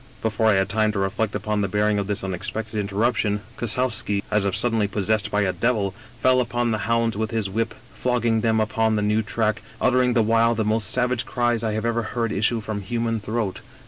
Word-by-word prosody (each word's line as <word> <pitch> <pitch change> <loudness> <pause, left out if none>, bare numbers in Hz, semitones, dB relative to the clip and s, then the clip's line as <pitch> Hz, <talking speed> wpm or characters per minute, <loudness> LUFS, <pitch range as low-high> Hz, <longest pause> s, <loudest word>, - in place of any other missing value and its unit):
" - - -25
Before 110 0 +1
I 110 - +5
had 95 0 +2
time 110 +2 +1
to - - -3
reflect 100 +2 -1
upon 105 -1 -1
the 100 - 0
bearing 105 +1 +1
of 100 - -3
this 100 -2 -2
unexpected 105 +4 -3
interruption, 105 +1 0
Kossowski, 115 -3 -1
as 105 -1 +2
if 100 - 0
suddenly 115 -4 +2
pos 100 0 -3
sessed 110 -2 +1
by 105 0 +1
a 95 -2 +1
devil, 100 0 0 0.3
fell 130 0 +4
upon 120 -1 -1
the 110 - -1
hounds 115 -1 +2
with 110 +1 -2
his 110 -4 -2
whip, 115 +2 -1 0.2
flog 125 -2 -1
ging 115 -1 +2
them 110 -1 +2
upon 110 0 +1
the 105 - 0
new 105 +1 +2
track, 110 0 -1 0.2
uttering 125 -1 +3
the 115 -2 +3
while 115 +1 +3
the 110 -1 -1
most 110 +1 +2
savage 125 -1 +1
cries 120 -3 0
I 110 -1 0
have 110 +1 -2
ever 115 0 +1
heard 115 0 -2
issue 110 +3 +1
from 105 -1 -4
human 115 +2 -1
throat. 105 -2 -3
110 Hz, 225 wpm, -23 LUFS, 105-115 Hz, 0.3 s, I